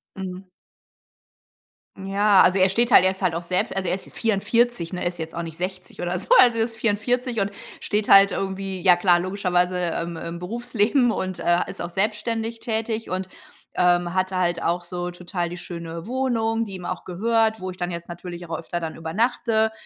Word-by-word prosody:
Mhm. 185 -1 -6 1.5
Ja, 195 +1 +3
also, 180 +1 +4
er 190 0 +4
steht 235 +5 +2
halt 185 - +8
er 185 - +4
ist 190 - -9
halt 180 -4 +1
auch 170 - -3
selbst 180 +2 -1
also, 185 -2 -1
er 180 - +1
ist 190 - -9
44, 225 -3 +1
ne, 180 - -3
ist 175 0 -2
jetzt 160 0 -6
auch 170 - -3
nicht 160 -1 -8
60 185 +1 -5
oder 175 +1 -1
so. 190 - -7
Also, 240 -2 +6
er 225 - +3
ist 225 0 -5
44 230 +2 0
und 200 +1 -1 0.3
steht 210 0 -1
halt 195 0 +8
irgendwie, 195 -1 -3
ja 180 -2 +6
klar, 175 -1 +4
logischerweise, 180 -1 0
ähm, 170 -1 -2
im 170 +1 -6
Berufsleben 235 +5 +1
und, 185 -3 -3
äh, 175 +1 +2
ist - - -7
auch - - -4
selbstständig 220 +4 -1
tätig 225 0 -3
und, 185 +1 -3 0.5
ähm, 175 -1 +2
hatte 185 0 0
halt 175 -1 0
auch 175 +1 0
so 175 0 -4
total 175 0 -4
die 175 - -7
schöne 170 -1 -7
Wohnung, 230 -3 0
die 200 -4 -6
ihm 180 -1 -8
auch 180 - -4
gehört, 220 +4 +1
wo 185 0 -5
ich 180 - -12
dann 175 0 -3
jetzt 170 0 -6
natürlich 175 0 -8
auch 165 -1 -3
öfter 175 +1 -4
dann 160 -1 -5
übernachte. 220 +6 0
185 Hz, 200 wpm, -23 LUFS, 175-220 Hz, 1.5 s, halt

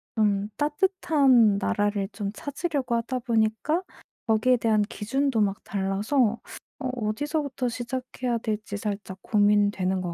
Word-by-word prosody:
좀 205 -2 +2
따뜻한 290 - +3
나라를 205 0 0
좀 200 -1 -4
찾으려고 285 -1 -3
하다 245 +2 -1
보니까 230 +8 +1 0.5
거기에 225 +3 +3
대한 220 -2 +2
기준도 230 +3 -1
막 200 -1 0
달라서 205 +5 0 0.4
어 265 - -3 0.2
어디서부터 280 +2 -2
시작해야 250 0 -3
될지 210 -2 -3
살짝 200 -2 -4
고민되는 205 -3 +2
것 175 -2 -3
220 Hz, 285 characters per minute, -26 LUFS, 205-260 Hz, 0.5 s, 따뜻한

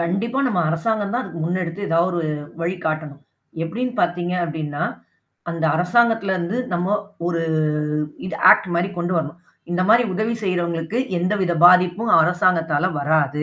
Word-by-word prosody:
கண்டிப்பா 195 +10 -1
நம்ம 195 -8 +1
அரசாங்கம் 205 +5 -1
தான் 245 - 0
அதுக்கு 165 -9 -8
முன்னெடுத்து 175 +1 -3
எதா 165 -2 +1
ஒரு 175 -1 -2 0.4
வழி 175 +3 -2
காட்டணும். 155 -2 -3 0.4
எப்பிடின்னு 240 +9 -3
பார்த்தீங்க 175 0 0
அப்பிடின்னா, 155 -3 -4 0.7
அந்த 165 -1 -3
அரசாங்கத்தில 200 +3 +2
இருந்து 185 +6 -2
நம்ம 180 +4 +1 0.3
ஒரு 170 -1 -1 0.8
இது - - -4
ஆக்ட் 190 - +4
மாரி 175 +3 +1
கொண்டு 175 +1 -1
வரணும். 160 +1 -3 0.3
இந்தமாரி 190 +7 +4
உதவி 220 +4 -1
செய்றவங்களுக்கு 175 +2 -2 0.2
எந்தவித 185 0 0
பாதிப்பும் 180 +5 +5
அரசாங்கத்தால 175 -1 +2
வராது. 150 0 +1
175 Hz, 135 wpm, -21 LUFS, 165-200 Hz, 0.8 s, பாதிப்பும்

